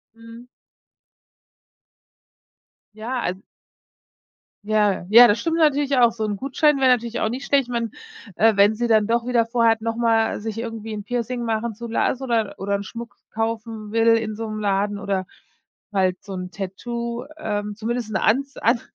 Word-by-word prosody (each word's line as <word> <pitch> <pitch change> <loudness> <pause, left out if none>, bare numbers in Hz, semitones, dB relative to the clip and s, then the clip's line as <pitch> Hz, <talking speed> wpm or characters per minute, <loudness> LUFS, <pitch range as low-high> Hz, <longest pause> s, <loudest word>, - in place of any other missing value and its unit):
Mhm. 230 +1 -13 2.5
Ja. 235 +4 -4
Al 180 - -1 1.3
Ja 210 -4 +1
ja, 235 +3 +9
das 205 +1 +2
stimmt 330 -1 -1
natürlich 290 -3 +2
auch. 240 -2 +5
So 225 -1 -5
'n 205 -1 -2
Gutschein 275 +4 +2
wär 265 - +4
natürlich 235 -2 +1
auch 220 - 0
nicht 255 +4 -5
schlecht. 280 -1 +3
Ich - - -17
mein, 235 -2 -2 0.4
äh, 220 0 +4
wenn 200 +2 +5
sie 240 +2 -1
dann 220 -2 +4
doch 235 +2 0
wieder 240 -2 +2
vorhat, 230 -1 +2
noch 225 0 -2
mal 225 -2 +1
sich 220 0 -5
irgendwie 225 -1 -5
'n 210 -1 -5
Piercing 240 +2 -3
machen 225 0 -2
zu 235 +2 -7
lassen 245 +3 0
oder 230 -5 0
oder 200 +1 -3
'n 200 - -2
Schmuck 230 +1 -9
kaufen 225 -1 -4
will 225 +1 +2
in 220 -1 -3
so 225 0 -5
'nem 215 - -5
Laden 205 0 0
oder 195 -2 -2 0.7
halt 185 -2 0
so 200 - -8
'n 180 -1 -5
Tattoo, 235 +5 -5
ähm, 210 -6 -3
zumindest 230 +1 -3
'n 200 - +1
An 245 +8 +2 0.2
An 230 +1 +2
225 Hz, 175 wpm, -22 LUFS, 210-240 Hz, 2.5 s, ja